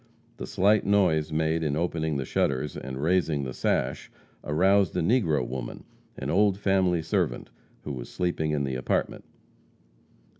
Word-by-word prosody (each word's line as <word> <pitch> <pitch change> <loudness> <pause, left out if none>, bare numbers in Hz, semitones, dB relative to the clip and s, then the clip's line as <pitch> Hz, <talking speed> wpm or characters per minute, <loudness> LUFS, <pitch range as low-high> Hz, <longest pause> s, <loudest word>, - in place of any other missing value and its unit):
The - - -6
slight 105 +3 +3
noise 90 -6 +2
made 80 +1 0
in 75 -3 0
opening 80 -2 -1
the 65 - -3
shutters 70 +2 -1
and 65 0 -6
raising 80 -4 +1
the 65 -2 -5
sash 65 +2 -1 0.3
aroused 95 +5 +2
a - - +2
negro 80 - +2
woman, 65 0 -6 0.3
an - - -3
old 100 +1 +3
family 95 -4 +1
servant, 60 -6 -1 0.3
who 75 - -5
was - - -7
sleeping 85 -3 -1
in 75 -2 0
the 65 -1 -2
apartment. 65 0 -2
80 Hz, 150 wpm, -27 LUFS, 70-95 Hz, 0.3 s, slight